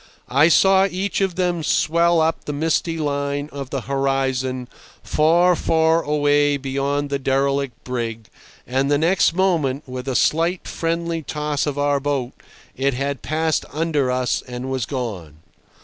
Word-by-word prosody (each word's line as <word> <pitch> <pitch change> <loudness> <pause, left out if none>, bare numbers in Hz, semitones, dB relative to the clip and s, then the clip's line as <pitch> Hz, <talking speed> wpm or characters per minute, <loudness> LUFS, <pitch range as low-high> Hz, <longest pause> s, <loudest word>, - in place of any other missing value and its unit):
I 140 +5 +5
saw 190 +3 +5
each 190 +3 -2
of 190 -3 0
them 180 -2 0
swell 170 +2 +2
up 160 +1 0
the 145 - -3
misty 165 +2 0
line 145 -1 -2
of 140 -2 -6
the 135 -1 -3
horizon, 130 -1 -1 0.4
far, 175 +4 +3
far 160 0 +2
away 145 -1 +2
beyond 140 +1 -2
the 140 - 0
derelict 135 -1 -1
brig, 115 -3 -4 0.4
and 135 +2 0
the 145 - +3
next 165 +2 +2
moment, 165 -8 +1
with 125 0 -6
a 130 - -1
slight 165 +6 +1
friendly 165 0 -2
toss 150 -1 -2
of 145 -1 -2
our 145 0 +1
boat, 135 -3 -2 0.4
it 135 0 0
had 140 +1 -3
passed 160 0 0
under 150 -4 0
us 125 0 0
and 125 +1 -5
was 130 -3 -2
gone. 105 - -5
145 Hz, 150 wpm, -21 LUFS, 135-165 Hz, 0.4 s, I